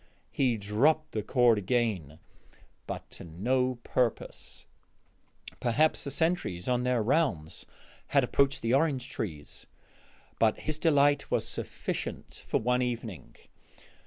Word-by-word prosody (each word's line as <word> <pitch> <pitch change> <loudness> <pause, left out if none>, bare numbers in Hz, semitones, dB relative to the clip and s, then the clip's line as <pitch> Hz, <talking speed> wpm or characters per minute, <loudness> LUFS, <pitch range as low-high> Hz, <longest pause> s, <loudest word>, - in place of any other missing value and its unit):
He 125 -4 +1
dropped 140 +10 +2
the 110 - -2
cord 120 -1 +3
again, 100 - -1 0.7
but - - -5
to - - -8
no 125 +10 0
purpose; 125 -3 -2 0.9
perhaps 135 +6 +2
the 140 - -3
sentries 150 - 0
on 125 -1 +2
their 125 -3 +2
rounds 120 - 0 0.4
had - - +3
approached 140 -2 +1
the 115 +1 +1
orange 135 -3 +2
trees. 75 -9 -6 0.7
But 110 -1 +2
his 155 0 -3
delight 145 -3 +3
was - - 0
sufficient - - -5
for - - +1
one 125 +2 +1
evening. 115 -6 -4
125 Hz, 120 wpm, -29 LUFS, 110-140 Hz, 0.9 s, cord